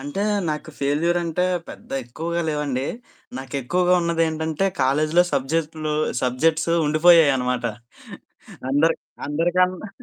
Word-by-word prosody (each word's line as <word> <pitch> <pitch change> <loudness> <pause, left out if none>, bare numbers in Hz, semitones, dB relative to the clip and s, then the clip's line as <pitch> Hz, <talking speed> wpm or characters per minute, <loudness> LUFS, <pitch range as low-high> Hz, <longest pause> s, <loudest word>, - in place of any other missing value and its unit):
అంటే 145 +9 -4 0.3
నాకు 155 +1 -5
ఫెయిల్యూర్ 150 +5 +1
అంటే 170 +2 0 0.2
పెద్ద - - -12
ఎక్కువగా 170 +7 -4
లేవండి. 145 -3 -2 0.5
నాకెక్కువగా 140 +7 0
ఉన్నదేంటంటే 160 +1 0 0.2
కాలేజీలో 155 +6 +3
సబ్జెక్ట్‌లు 155 +2 -1 0.3
సబ్జెక్ట్స్ 160 +6 +1 0.2
ఉండిపోయాయనమాట 150 -6 +4 1.1
అందర్ 160 +4 +3 0.3
అందరికన్నా 180 +6 0
155 Hz, 90 wpm, -22 LUFS, 140-170 Hz, 1.1 s, ఉండిపోయాయనమాట